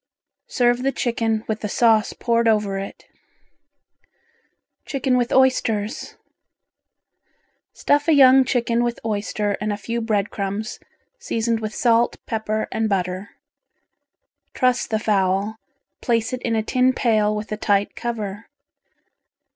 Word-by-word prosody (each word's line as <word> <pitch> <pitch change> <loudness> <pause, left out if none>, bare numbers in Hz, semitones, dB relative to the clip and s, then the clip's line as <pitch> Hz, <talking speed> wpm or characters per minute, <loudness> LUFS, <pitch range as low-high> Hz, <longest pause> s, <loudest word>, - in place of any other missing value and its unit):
Serve 245 0 +1
the 270 +1 +1
chicken 225 -3 -1
with 220 0 -2
the 210 - -4
sauce 225 0 +3
poured 235 -1 0
over 210 -3 +1
it. 195 - -8 1.8
Chicken 265 -2 -1
with 245 -1 0
Oysters 230 -4 +1 1.6
Stuff 290 +1 +1
a - - +4
young 265 -2 +7
chicken 240 -2 0
with 240 0 -2
oyster 210 -1 -1
and 210 0 -1
a 205 - -2
few 230 +3 -4
bread 215 -3 -1
crumbs, 200 +3 -4 0.4
seasoned 230 - -1
with 215 -1 -5
salt, 235 -1 +2
pepper 215 -1 -2
and 220 0 -1
butter. 185 0 -2 1.3
Truss 255 -2 +1
the 220 - 0
fowl, 200 0 0 0.4
place 230 -1 0
it 250 - -3
in 230 -2 -1
a 220 - 0
tin 255 +2 +2
pail 215 -4 +1
with 210 0 -6
a 215 - -2
tight 205 -1 0
cover. 215 -3 -5
225 Hz, 130 wpm, -22 LUFS, 210-240 Hz, 1.8 s, young